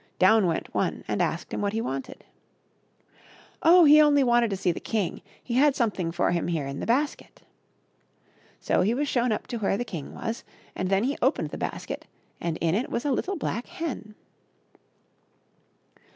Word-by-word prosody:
Down 195 Hz, +1 st, +5 dB
went 165 Hz, -, -3 dB
one -, -, -1 dB
and -, -, -1 dB
asked -, -, -2 dB
him -, -, -2 dB
what 200 Hz, 0 st, -1 dB
he 225 Hz, -, 0 dB
wanted. 135 Hz, -, -5 dB, 1.4 s
Oh! 350 Hz, +2 st, +7 dB
he 300 Hz, +1 st, +8 dB
only 290 Hz, -2 st, +5 dB
wanted 240 Hz, -2 st, +3 dB
to 195 Hz, -, -2 dB
see 180 Hz, -, +1 dB
the -, -, -5 dB
king; 210 Hz, -6 st, -2 dB, 0.2 s
he 240 Hz, -, -5 dB
had 275 Hz, +3 st, +4 dB
something 195 Hz, -8 st, -1 dB
for 175 Hz, +1 st, +1 dB
him 170 Hz, -2 st, -1 dB
here 165 Hz, -5 st, -1 dB
in 140 Hz, 0 st, -5 dB
the -, -, -4 dB
basket. 275 Hz, +6 st, -1 dB, 1.2 s
So -, -, +1 dB
he 220 Hz, +5 st, +2 dB
was 290 Hz, +3 st, -1 dB
shown 245 Hz, -3 st, +1 dB
up 215 Hz, -, -2 dB
to 245 Hz, -, -5 dB
where 195 Hz, -1 st, 0 dB
the 245 Hz, -, -3 dB
king 160 Hz, -10 st, -7 dB
was, 225 Hz, +1 st, -4 dB, 0.3 s
and 185 Hz, -, -2 dB
then 195 Hz, +2 st, +2 dB
he 275 Hz, +4 st, -1 dB
opened -, -, +1 dB
the -, -, -5 dB
basket -, -, -5 dB, 0.3 s
and 165 Hz, -2 st, -2 dB
in 165 Hz, 0 st, +2 dB
it 225 Hz, +7 st, -1 dB
was 240 Hz, -, -3 dB
a 290 Hz, -, +1 dB
little 375 Hz, +9 st, -1 dB
black 245 Hz, -5 st, -3 dB
hen. 320 Hz, -11 st, -6 dB
225 Hz, 185 wpm, -26 LUFS, 185-270 Hz, 1.4 s, he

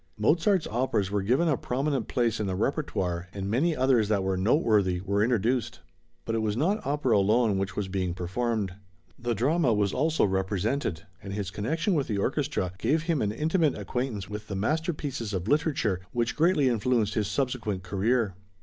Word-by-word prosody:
Mozart's 165 Hz, -, +2 dB
operas 110 Hz, -4 st, 0 dB
were 100 Hz, -1 st, +1 dB
given 125 Hz, -, +2 dB
a 150 Hz, -, +3 dB
prominent 135 Hz, -1 st, -1 dB
place 120 Hz, -3 st, 0 dB
in 105 Hz, -, -1 dB
the 95 Hz, -1 st, -2 dB
répertoire, 95 Hz, -, -1 dB
and 100 Hz, -1 st, -3 dB
many 155 Hz, +8 st, +2 dB
others 125 Hz, -5 st, +3 dB
that 100 Hz, -3 st, +1 dB
were 95 Hz, 0 st, 0 dB
noteworthy 100 Hz, -, +2 dB
were 100 Hz, +2 st, 0 dB
introduced. 120 Hz, +1 st, 0 dB, 0.4 s
But 115 Hz, -, -2 dB
it 115 Hz, -, +1 dB
was 110 Hz, 0 st, -1 dB
not 190 Hz, -, +1 dB
opera 140 Hz, -3 st, +1 dB
alone 105 Hz, +1 st, +3 dB
which 95 Hz, +2 st, -3 dB
was 105 Hz, -2 st, -2 dB
being 95 Hz, -2 st, -2 dB
performed; 100 Hz, +2 st, -2 dB, 0.5 s
the 120 Hz, -1 st, -1 dB
drama 135 Hz, -, +2 dB
was 100 Hz, -2 st, +1 dB
also 155 Hz, +2 st, +2 dB
represented, 95 Hz, -, -1 dB, 0.2 s
and 100 Hz, 0 st, -7 dB
his 100 Hz, -2 st, -3 dB
connection 160 Hz, -, -1 dB
with 145 Hz, -5 st, 0 dB
the 105 Hz, -, -1 dB
orchestra 130 Hz, -, -1 dB
gave 155 Hz, +2 st, +1 dB
him 165 Hz, -4 st, 0 dB
an 105 Hz, -, 0 dB
intimate 155 Hz, -, +1 dB
acquaintance 125 Hz, -6 st, -3 dB
with 105 Hz, +1 st, -7 dB
the 100 Hz, -, -4 dB
masterpieces 145 Hz, -, -2 dB
of 90 Hz, +1 st, -3 dB
literature, 140 Hz, -, +1 dB
which 120 Hz, 0 st, 0 dB
greatly 160 Hz, -3 st, +3 dB
influenced 115 Hz, -2 st, +1 dB
his 105 Hz, -3 st, 0 dB
subsequent 115 Hz, -8 st, -2 dB
career. 105 Hz, +3 st, 0 dB
115 Hz, 175 wpm, -27 LUFS, 100-140 Hz, 0.5 s, a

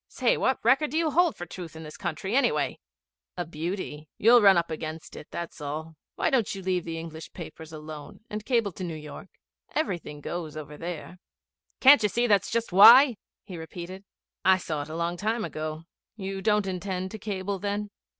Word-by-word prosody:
Say, 250 Hz, -2 st, +1 dB
what 260 Hz, -, +1 dB
record 270 Hz, +5 st, +4 dB
do 305 Hz, -, -2 dB
you 325 Hz, -2 st, +2 dB
hold 345 Hz, +1 st, +3 dB
for 175 Hz, -, -6 dB
truth 175 Hz, -1 st, -9 dB
in 160 Hz, -, -8 dB
this 155 Hz, -1 st, -9 dB
country, 190 Hz, +3 st, -3 dB
anyway?' 230 Hz, -, +1 dB, 0.6 s
'A 175 Hz, -, -2 dB
beauty. 160 Hz, -1 st, -5 dB
You 235 Hz, +3 st, +7 dB
ran 195 Hz, -4 st, +7 dB
up 170 Hz, -1 st, 0 dB
against 155 Hz, 0 st, -6 dB
it, -, -, -9 dB
that's 170 Hz, -2 st, -6 dB
all. 155 Hz, +2 st, -5 dB, 0.2 s
Why -, -, 0 dB
don't 240 Hz, -7 st, +1 dB
you 195 Hz, -, -7 dB
leave 180 Hz, -2 st, 0 dB
the 165 Hz, -1 st, -4 dB
English 160 Hz, -1 st, -8 dB
papers 160 Hz, -2 st, -9 dB
alone 155 Hz, +1 st, -9 dB
and 210 Hz, 0 st, -5 dB
cable 230 Hz, -4 st, +1 dB
to 185 Hz, -, -8 dB
New 170 Hz, -3 st, -4 dB
York? 150 Hz, +4 st, -9 dB, 0.5 s
Everything 175 Hz, -, -2 dB
goes 155 Hz, 0 st, -5 dB
over 150 Hz, -1 st, -7 dB
there.' 175 Hz, +2 st, -7 dB, 0.6 s
'Can't 275 Hz, -2 st, +9 dB
you 210 Hz, -, +2 dB
see 240 Hz, +4 st, +1 dB
that's 205 Hz, -4 st, +3 dB
just 230 Hz, -3 st, -1 dB
why?' 235 Hz, +6 st, +9 dB, 0.3 s
he 180 Hz, -5 st, -8 dB
repeated. 175 Hz, +3 st, -8 dB, 0.4 s
'I 190 Hz, +1 st, +6 dB
saw 155 Hz, -5 st, -3 dB
it 145 Hz, -, -7 dB
a 160 Hz, -, -6 dB
long 170 Hz, +1 st, -1 dB
time 220 Hz, +3 st, -1 dB
ago. 155 Hz, +1 st, -5 dB, 0.3 s
You 195 Hz, -2 st, -5 dB
don't 210 Hz, -1 st, +2 dB
intend 185 Hz, 0 st, -3 dB
to 220 Hz, -, -7 dB
cable 200 Hz, -1 st, -3 dB
then?' 205 Hz, +1 st, -3 dB
185 Hz, 195 wpm, -27 LUFS, 160-210 Hz, 0.6 s, Can't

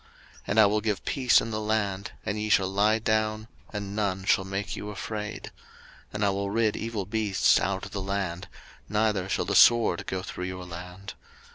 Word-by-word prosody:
03:026:006 -, -, -27 dB, 0.4 s
And 105 Hz, -, +2 dB
I 110 Hz, -, +8 dB
will 105 Hz, +1 st, +2 dB
give 105 Hz, -3 st, -2 dB
peace 130 Hz, -3 st, +4 dB
in 115 Hz, -, -5 dB
the 110 Hz, 0 st, -2 dB
land, 105 Hz, -2 st, -1 dB
and 105 Hz, 0 st, -2 dB
ye 105 Hz, 0 st, -2 dB
shall 100 Hz, -2 st, +4 dB
lie 105 Hz, +3 st, +3 dB
down, 110 Hz, 0 st, 0 dB, 0.2 s
and 100 Hz, -1 st, -5 dB
none 95 Hz, -3 st, -1 dB
shall 95 Hz, -, +3 dB
make 95 Hz, +1 st, -4 dB
you 105 Hz, -, -6 dB
afraid: 105 Hz, +1 st, -5 dB, 0.6 s
and 105 Hz, 0 st, -1 dB
I 100 Hz, -, +3 dB
will 100 Hz, 0 st, -2 dB
rid 110 Hz, 0 st, +1 dB
evil 110 Hz, -3 st, -3 dB
beasts 105 Hz, -2 st, +2 dB
out 95 Hz, -1 st, -2 dB
of -, -, -10 dB
the 100 Hz, -, -3 dB
land, 95 Hz, -3 st, -3 dB, 0.4 s
neither 105 Hz, -3 st, +1 dB
shall -, -, 0 dB
the -, -, -2 dB
sword 115 Hz, -4 st, +5 dB
go 95 Hz, 0 st, -3 dB
through 90 Hz, -1 st, -5 dB
your 90 Hz, 0 st, -6 dB
land. 90 Hz, +3 st, -8 dB
100 Hz, 200 wpm, -27 LUFS, 95-110 Hz, 0.6 s, I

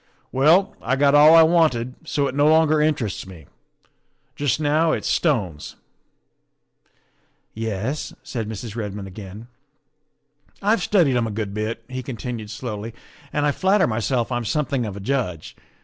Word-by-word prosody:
Well, 160 Hz, +9 st, +3 dB
I 130 Hz, -, 0 dB
got 140 Hz, +1 st, +3 dB
all 150 Hz, +2 st, +8 dB
I 165 Hz, -, +9 dB
wanted, 155 Hz, -8 st, +2 dB
so 145 Hz, -3 st, 0 dB
it 130 Hz, -, -4 dB
no 145 Hz, +2 st, +3 dB
longer 155 Hz, -1 st, +4 dB
interests 130 Hz, -, -1 dB
me. 85 Hz, -6 st, -12 dB, 0.9 s
Just 145 Hz, -1 st, 0 dB
now 155 Hz, +2 st, +2 dB
it's -, -, -3 dB
stones." 100 Hz, -, -1 dB, 0.9 s
" -, -, -43 dB, 0.2 s
Yes?" 110 Hz, +9 st, -3 dB
said 115 Hz, -4 st, -5 dB
Mrs. 110 Hz, 0 st, -7 dB
Redmond 105 Hz, -3 st, -5 dB
again. 100 Hz, +3 st, -10 dB, 0.6 s
" -, -, -51 dB, 0.3 s
I've 210 Hz, 0 st, +2 dB
studied 175 Hz, -10 st, +2 dB
'em 115 Hz, -2 st, 0 dB
a -, -, -4 dB
good 105 Hz, -2 st, -4 dB
bit," 110 Hz, +2 st, -4 dB
he 130 Hz, 0 st, -5 dB
continued 120 Hz, -3 st, -6 dB
slowly, 110 Hz, 0 st, -6 dB, 0.2 s
" 140 Hz, -, -24 dB
and 145 Hz, 0 st, 0 dB
I 145 Hz, -, +3 dB
flatter 190 Hz, +6 st, +2 dB
myself 120 Hz, +2 st, -1 dB
I'm 120 Hz, -1 st, -1 dB
something 125 Hz, +1 st, -1 dB
of 100 Hz, -1 st, -6 dB
a -, -, -6 dB
judge. 100 Hz, -, -3 dB
125 Hz, 160 wpm, -22 LUFS, 105-150 Hz, 0.9 s, I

